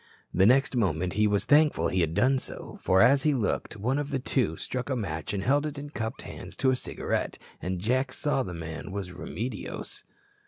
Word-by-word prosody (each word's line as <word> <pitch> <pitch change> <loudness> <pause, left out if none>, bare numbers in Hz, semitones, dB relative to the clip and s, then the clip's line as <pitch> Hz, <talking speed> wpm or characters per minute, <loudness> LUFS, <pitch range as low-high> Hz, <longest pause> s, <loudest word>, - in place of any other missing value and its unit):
The 95 +2 +5
next 135 +2 +4
moment 90 -6 +1
he 105 +1 +3
was 105 -1 +2
thankful 145 - +4
he 95 - +2
had 80 0 0
done 130 +6 +3
so. - - -8
For, 95 +1 +5
as 135 +2 +5
he 150 0 +2
looked, 110 -2 -1
one 125 +7 0
of 145 -1 -3
the 140 - 0
two 130 0 0
struck 130 +1 -4
a 130 - +1
match 80 -9 -3
and 100 -1 -2
held 145 +5 +2
it 150 -1 -6
in 145 +1 -7
cupped 110 -2 -4
hands - - -9
to 130 -1 +3
a - - +2
cigarette, - - -2 0.2
and 90 +1 -2
Jack 130 +7 0
saw 145 -3 0
the 90 -7 -4
man 80 +3 -6
was 95 -2 -4
Remedios. 105 +4 -5
115 Hz, 210 wpm, -28 LUFS, 95-135 Hz, 0.2 s, The